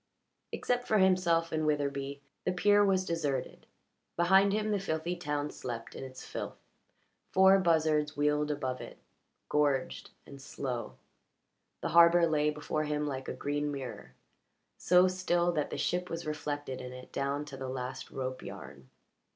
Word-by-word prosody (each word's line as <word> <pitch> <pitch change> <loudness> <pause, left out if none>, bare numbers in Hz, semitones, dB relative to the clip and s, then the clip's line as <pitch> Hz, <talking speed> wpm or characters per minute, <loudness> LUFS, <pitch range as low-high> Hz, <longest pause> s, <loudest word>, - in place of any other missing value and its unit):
Except 245 0 -1
for 215 - +3
himself 180 -3 +3
and 155 0 0
Witherbee 140 -1 -1 0.2
the 185 - 0
pier 205 +3 +4
was 190 -2 +2
deserted; 155 -6 -3 0.5
behind 190 +3 +5
him 215 +1 0
the 205 - +1
filthy 170 -1 -2
town 150 -4 -2
slept 115 -2 -6
in - - -7
its 130 -1 -9
filth. - - -6 0.7
Four 190 +1 +6
buzzards 155 -4 +2
wheeled 150 0 +1
above 130 -4 -2
it, - - -9 0.5
gorged 145 -3 0 0.2
and 140 -1 -12
slow; 125 -3 -5 0.9
the - - -2
harbour 170 +1 +7
lay 150 -2 +2
before 150 +1 -2
him 150 0 -1
like 135 -2 -4
a - - -3
green 145 +1 -2
mirror, 135 -4 -7 0.6
so 180 +1 +5
still 175 -1 +1
that 150 -3 -1
the - - -4
ship 180 0 -1
was 165 +1 -4
reflected 145 -3 -4
in 125 0 -7
it 125 0 -11
down 140 +2 -1
to 145 -2 -9
the 130 -1 -5
last 130 0 -5
rope 130 -1 -4
yarn. 70 -3 -10
150 Hz, 155 wpm, -31 LUFS, 140-175 Hz, 0.9 s, harbour